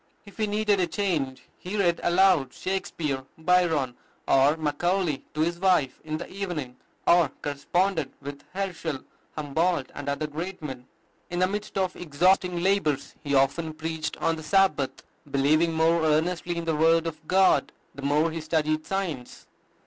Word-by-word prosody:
If 200 - -15
he 215 -1 0
needed 210 -1 +1
a 180 - +2
change, 160 -7 -2 0.2
he 190 +4 -5
read 175 -4 +2
aloud 175 -7 +3
Shakspeare, 155 -7 -3
Byron, 160 -6 +2 0.3
or 140 +3 +4
Macaulay 160 +1 0
to 155 - 0
his 170 +2 0
wife 175 -9 +2
in 155 0 -3
the 170 - -7
evening, 170 -10 -5 0.3
or 170 -2 +5
corresponded 160 +2 0
with 140 0 -8
Herschel, 175 -7 -3 0.4
Humboldt, 155 0 0
and 145 0 -5
other 140 +2 -1
great 170 +6 -5
men. 130 -5 -7 0.4
In 175 - -4
the 185 - +4
midst 205 +1 -4
of 185 -1 0
exhausting 175 +2 +2
labors 155 -8 +1
he 140 -2 0
often 155 +4 +1
preached 160 0 -4
on 165 0 0
the - - -7
Sabbath, 155 -4 +1 0.3
believing 150 +5 +3
more 165 +1 +3
earnestly 165 +3 +1
in 170 - -3
the 160 -1 0
word 165 +2 +4
of 160 -1 -6
God 190 0 +4 0.2
the 140 - -9
more 150 +4 +2
he 165 0 -4
studied 155 -1 0
science. 170 -11 -4
160 Hz, 155 wpm, -26 LUFS, 145-180 Hz, 0.4 s, or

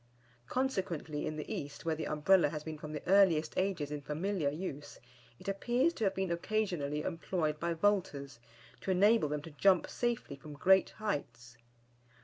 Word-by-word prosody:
Consequently, 185 - -2
in 155 - -3
the 155 - -5
East, 145 +2 -6
where 165 - +1
the 155 - -3
Umbrella 150 +2 +4
has 150 0 -5
been 155 -1 -6
from 150 0 -7
the 150 - -5
earliest 180 -5 +4
ages 185 -6 -1
in 150 -1 -4
familiar 160 +2 -1
use, 150 -2 -6 0.4
it - - -14
appears 240 +10 +1
to 225 - -4
have 195 - +1
been 190 -2 -1
occasionally 170 -6 -1
employed 165 -3 -2
by 170 0 -1
vaulters, 165 -9 0 0.4
to - - -6
enable 200 -2 +4
them 150 0 -3
to 165 - -9
jump 185 +5 +3
safely 240 - -2
from 145 +2 -11
great 190 +6 +4
heights. 125 - -4
165 Hz, 165 wpm, -33 LUFS, 150-195 Hz, 0.4 s, Umbrella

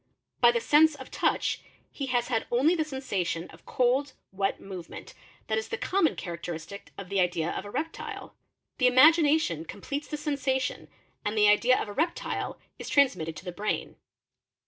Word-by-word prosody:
By 240 - +7
the 235 - 0
sense 300 +7 +5
of - - -11
touch - - 0 0.3
he 275 - -5
has 245 -1 0
had 225 -3 0
only 265 +8 +4
the 325 -3 +1
sensation 200 - -3
of - - -18
cold, 260 +2 +1 0.2
V - - -21
vet, - - -1
movement, 185 -3 -9 0.3
that 220 0 0
is 220 - -6
the 465 - -3
common 370 -8 +1
characteristic 170 +1 -7
of 195 - -7
the 200 -1 0
idea 175 -2 +1
of 190 - -5
a - - -7
reptile. 320 +9 -5 0.5
e 250 - +6
imagination 290 - +5
completes 280 - -6
the 300 - -4
sensation 275 -3 -1 0.4
and 210 +1 -2
the 210 0 +6
idea 235 +5 +5
of - - -3
a 205 - -7
reptile 330 +8 -2 0.2
is - - -6
Psnsmitio' 185 - +2
to 160 - -10
the 180 - -4
brain. 205 +4 -3
240 Hz, 175 wpm, -28 LUFS, 190-285 Hz, 0.5 s, By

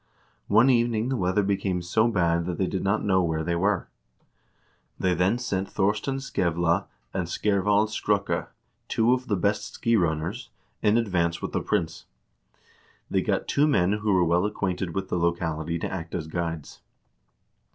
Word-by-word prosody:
One 125 +4 +5
evening 120 -1 +1
the 135 - 0
weather 95 -1 +1
became 95 -2 -1
so 110 +6 +2
bad 85 -6 +1
that 90 -2 -3
they 95 - +1
did 95 0 -3
not 100 +3 0
know 95 -2 +3
where 80 -2 -1
they 85 +1 -1
were. 95 +2 +1 1.1
They 90 -1 +2
then 90 +6 +2
sent 100 -6 -2
Thorstein 105 +7 0
Skevla 85 -9 0 0.3
and 95 -3 -2
Skervald 105 +2 +2
Skrukka, 105 -1 0 0.4
two 115 +2 +3
of 130 0 -2
the 105 - +1
best 100 +2 -1
ski 115 0 +1
runners, 85 - -1 0.3
in 105 +1 +3
advance 85 -7 0
with - - -4
the - - -1
prince; 80 -1 -2 1.1
they - - +2
got - - -1
two 145 +2 +3
men 95 -10 +3
who 105 0 0
were 90 -2 +4
well 85 +4 +2
acquainted 95 -4 -3
with 95 -1 -3
the 90 - 0
lo 85 0 +2
cality 80 -1 -3
to - - -2
act 85 -3 -5
as 80 - -3
guides. 80 -2 -5
95 Hz, 170 wpm, -26 LUFS, 85-105 Hz, 1.1 s, One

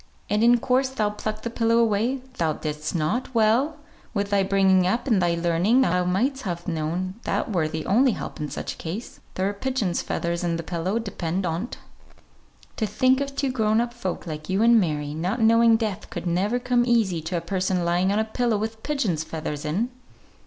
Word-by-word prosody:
"And 210 +2 +2
in 240 +1 +6
course 255 +2 +1
thou 215 -6 -1
plucked 215 +1 -5
the 235 - -3
pillow 230 0 +2
away? 230 +3 +2 0.2
Thou 160 -2 +1
didst 150 +2 -4
not! 210 +11 -1
Well! 235 +8 +3 0.4
with 200 0 -1
thy 200 -1 +3
bringing 190 -1 +3
up, 235 +6 0
and 220 -8 +2
thy 170 -1 +2
learning, 175 +9 +2
thou 180 -5 +2
might'st 250 +10 0
have 175 -6 -5
known 170 +3 -2
that - - -2
were 165 -4 +1
the 160 0 -4
only 245 +5 +4
help - - -6
in 150 -1 -3
such - - -4
a - - -16
case. 185 +9 -6 0.2
There 185 - 0
were 200 - 0
pigeons' 210 -5 -1
feathers 170 +1 -2
in 170 -1 0
the 165 - -5
pillow, 175 +5 -2
depend 190 -4 -3
on't. 175 +8 -3 1.0
To 220 - 0
think 255 +6 +2
of 280 0 -4
two 275 -2 0
grown 220 -3 +2
up 240 0 -1
folk 190 -7 -4
like 155 -1 -6
you 190 +3 +2
and 235 0 +6
Mary, 150 -5 -1
not 180 +9 -2
knowing 230 0 +5
death 215 -5 -3
could 180 -5 -6
never 190 +7 +1
come 245 -1 +2
easy 225 -9 +2
to 170 +3 -3
a - - -2
person 185 -2 -1
lying 175 +3 +2
on 205 - +1
a 220 - +1
pillow 230 0 0
with 220 +1 -4
pigeons' 225 - -1
feathers 155 -1 -5
in!" 195 +11 0
200 Hz, 205 wpm, -24 LUFS, 170-235 Hz, 1.0 s, in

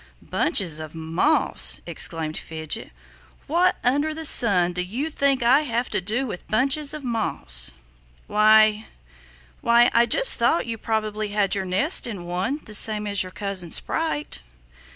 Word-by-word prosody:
"Bunches 180 - -1
of 155 0 -9
moss!" 165 - +2
exclaimed 160 -2 -2
Fidget. 160 +6 -5 0.6
"What 345 +5 +1
under 290 +5 0
the 320 0 -1
sun 185 - +4
do 180 - -2
you 245 - -5
think 275 -4 0
I 260 +5 +4
have 245 -4 -3
to - - -1
do 220 +8 -1
with 200 -8 -8
bunches 275 +5 0
of 300 - -8
moss?" 65 - +1 0.5
"Why 215 0 +3 0.7
why 235 +1 +3
I 235 0 +3
just - - +3
thought 335 - +1
you 230 -1 -6
probably 215 -1 -3
had 205 -1 -1
your 195 -1 -2
nest 200 - 0
in 195 -7 -7
one, 185 - -3
the 215 - -11
same 210 0 +5
as 200 -2 0
your 185 - -3
cousin 195 -3 -3
Sprite." 315 - -2
215 Hz, 150 wpm, -22 LUFS, 185-270 Hz, 0.7 s, same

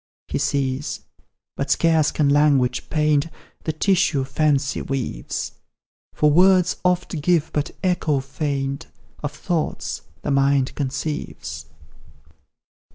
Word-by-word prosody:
He - - -2
sees 135 0 -1 0.5
but 140 - -3
scarce 160 0 +3
can 150 - +1
language 140 -4 +3
paint 150 -1 +2 0.4
The 160 - +1
tissue 170 -3 +2
fancy 145 0 +1
weaves; 135 - -3 0.6
For 150 0 +3
words 185 +2 +5
oft 180 -3 0
give 170 -1 +2
but 150 -1 0
echo 165 -6 +1
faint 140 +1 -3 0.3
Of 145 - -3
thoughts 160 +1 -2 0.2
the 145 - -1
mind 140 -1 +2
conceives. 145 - -4
150 Hz, 105 wpm, -22 LUFS, 140-160 Hz, 0.6 s, words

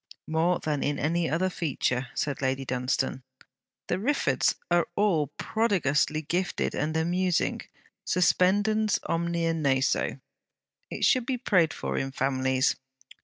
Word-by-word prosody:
'More 165 +3 +2
than 150 -2 -2
in 145 0 0
any 165 +2 0
other 185 +3 0
feature,' 135 -6 -1
said 140 -2 -2
Lady 135 0 -1
Dunstane. 130 +1 -1 0.6
'The 180 - -1
Riffords 280 +8 +1 0.2
are 175 -1 +3
all 185 -8 +2
prodigiously 165 -8 +1
gifted 175 +5 -1
and 155 +2 -1
amusing: 175 +2 0 0.4
suspendens 205 +4 +2
omnia 170 0 0
naso. 140 -4 0 0.7
It - - -1
should 255 -2 +3
be 260 -2 0
prayed 180 - +2
for - - -3
in 135 0 -3
families.' 130 0 +1
165 Hz, 120 wpm, -27 LUFS, 140-185 Hz, 0.7 s, are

